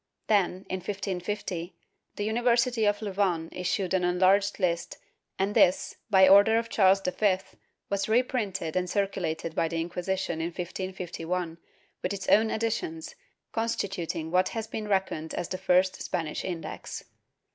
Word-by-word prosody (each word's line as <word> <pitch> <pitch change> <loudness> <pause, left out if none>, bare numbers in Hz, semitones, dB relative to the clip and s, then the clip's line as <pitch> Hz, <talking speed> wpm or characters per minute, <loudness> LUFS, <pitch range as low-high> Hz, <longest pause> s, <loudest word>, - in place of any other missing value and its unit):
^ - - -56 0.2
Then, 190 -3 +1
in 185 - -2
1550, 190 -2 -4 0.4
the 205 - -3
University 235 +1 +2
of 205 +1 +1
Louvain 190 -5 0
issued 180 +1 -1
an 185 -1 +2
enlarged 190 +3 +3
list 170 -3 -1 0.4
and 195 +2 0
this, 180 -2 +3
by 190 -2 +7
order 200 +4 +7
of 230 0 -1
Charles 195 -2 +4
V, 185 +1 +2 0.5
was 200 +1 -1
reprinted 215 -8 0
and 180 -1 0
circulated 175 -5 -1
by 165 - +1
the 165 - -5
Inqui 170 +2 -3
sition 190 -3 -1
in 165 - -1
1551, 180 -2 -4 0.4
with 185 - -1
its 195 -1 -5
own 220 +1 +5
additions, 320 - -2 0.4
constituting 190 -8 -2
what 185 +1 +3
has 225 -1 -4
been 215 -1 -5
reckoned 190 -5 -1
as 175 - -3
the 185 - -4
first 185 0 +2
Spanish 160 -3 -3
Index. 165 -4 -5
190 Hz, 145 wpm, -28 LUFS, 175-205 Hz, 0.5 s, by